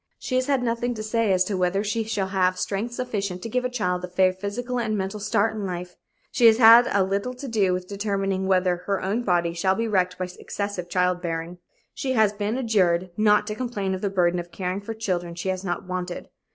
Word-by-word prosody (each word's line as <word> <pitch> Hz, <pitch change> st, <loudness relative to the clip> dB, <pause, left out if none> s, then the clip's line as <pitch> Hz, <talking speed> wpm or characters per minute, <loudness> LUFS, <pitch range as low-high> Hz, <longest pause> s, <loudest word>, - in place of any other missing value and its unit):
She -, -, -6 dB
has 255 Hz, +1 st, +1 dB
had 275 Hz, -3 st, +1 dB
nothing 240 Hz, +1 st, -1 dB
to 215 Hz, -, -5 dB
say 220 Hz, -1 st, +1 dB
as 185 Hz, -1 st, +4 dB
to 195 Hz, +1 st, -3 dB
whether 185 Hz, +2 st, +1 dB
she 215 Hz, +2 st, -1 dB
shall 205 Hz, -3 st, -2 dB
have 185 Hz, -1 st, +1 dB
strength 210 Hz, +6 st, -3 dB
sufficient 200 Hz, -8 st, -3 dB
to 230 Hz, -, -4 dB
give 250 Hz, +2 st, 0 dB
a 250 Hz, -, -1 dB
child 180 Hz, -7 st, -1 dB
a -, -, -3 dB
fair 185 Hz, +1 st, +2 dB
physical 235 Hz, +6 st, -4 dB
and 215 Hz, -2 st, -1 dB
mental 195 Hz, +2 st, -3 dB
start 210 Hz, +1 st, +1 dB
in 210 Hz, -, -4 dB
life; 180 Hz, -1 st, -5 dB, 0.4 s
she 235 Hz, -, +5 dB
has 220 Hz, -1 st, +6 dB
had 235 Hz, +1 st, +8 dB
as 195 Hz, -2 st, +2 dB
little 200 Hz, +6 st, -2 dB
to 270 Hz, +2 st, -7 dB
do 210 Hz, -6 st, +2 dB
with 180 Hz, 0 st, -2 dB
determining 195 Hz, -1 st, -1 dB
whether 185 Hz, -2 st, +2 dB
her 200 Hz, -1 st, +1 dB
own 205 Hz, +5 st, -1 dB
body 175 Hz, -6 st, +1 dB
shall 190 Hz, +2 st, +1 dB
be 230 Hz, +2 st, -1 dB
wrecked 185 Hz, -3 st, +1 dB
by 185 Hz, -, -3 dB
excessive 200 Hz, -4 st, -4 dB
child 180 Hz, 0 st, +1 dB
bearing. 170 Hz, 0 st, -4 dB, 0.3 s
She 260 Hz, -1 st, -2 dB
has 215 Hz, -4 st, +3 dB
been 210 Hz, +3 st, -2 dB
adjured 185 Hz, -7 st, +1 dB
not 210 Hz, 0 st, +4 dB
to 210 Hz, -, -3 dB
complain 210 Hz, -5 st, -3 dB
of 190 Hz, -, -4 dB
the 200 Hz, -, 0 dB
burden 180 Hz, -2 st, +1 dB
of 175 Hz, 0 st, -7 dB
caring 185 Hz, +1 st, -3 dB
for 225 Hz, +2 st, -6 dB
children 175 Hz, -6 st, -3 dB
she 175 Hz, +2 st, -3 dB
has 185 Hz, 0 st, -2 dB
not 175 Hz, -2 st, -3 dB
wanted. 180 Hz, -1 st, -5 dB
195 Hz, 230 wpm, -24 LUFS, 180-220 Hz, 0.4 s, had